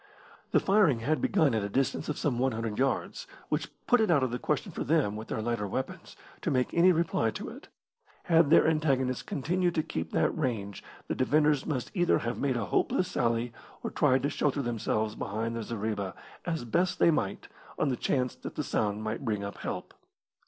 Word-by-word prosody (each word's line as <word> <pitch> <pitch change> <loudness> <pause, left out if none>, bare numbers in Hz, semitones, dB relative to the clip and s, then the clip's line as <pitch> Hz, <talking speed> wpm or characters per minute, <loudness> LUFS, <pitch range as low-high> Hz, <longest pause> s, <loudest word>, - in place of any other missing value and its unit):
The - - +4
firing 190 - +3
had 155 +7 0
begun 160 - +3
at 110 - +1
a 100 - -2
distance 135 +7 0
of 150 - -2
some 125 -5 0
100 115 -4 -1
yards, 135 - -1 0.2
which - - -1 0.2
put 245 -2 +4
it 220 - +2
out 150 -6 +4
of 130 - 0
the 125 - -2
question - - -1
for - - -4
them, 140 -8 +2
with 110 +1 -7
their 110 - -3
lighter 115 -3 -1
weapons, 130 +7 -5 0.2
to - - -1
make 125 -1 +1
any 180 +2 +6
reply 165 -9 +1
to - - -6
it. - - -11 0.6
Had 165 -3 +4
their 165 - +6
antagonists 135 -5 +1
continued 175 +4 -1
to 155 - +1
keep 80 - -4
that 80 - +1
range 115 -10 -2 0.2
the - - -1
defenders 150 +1 +2
must 135 -6 -2
either 175 -4 +3
have 120 0 -3
made 135 -3 +1
a 115 - -1
hopeless 180 - +1
sally 115 -5 0 0.3
or - - -3
tried 130 0 +3
to 145 - +1
shelter 140 -1 0
themselves 110 -2 -1
behind 115 +2 -3
their 115 - -3
zareba 105 -3 -3 0.3
as 165 -7 -2
best 175 +10 +1
they 170 - +5
might 150 - -2 0.3
on - - +1
the 130 - 0
chance 125 +1 0
that - - -8
the - - -1
sound 105 0 -1
might 110 +4 -3
bring 105 -5 -1
up 100 0 -6
help. - - -5
130 Hz, 200 wpm, -29 LUFS, 110-155 Hz, 0.6 s, any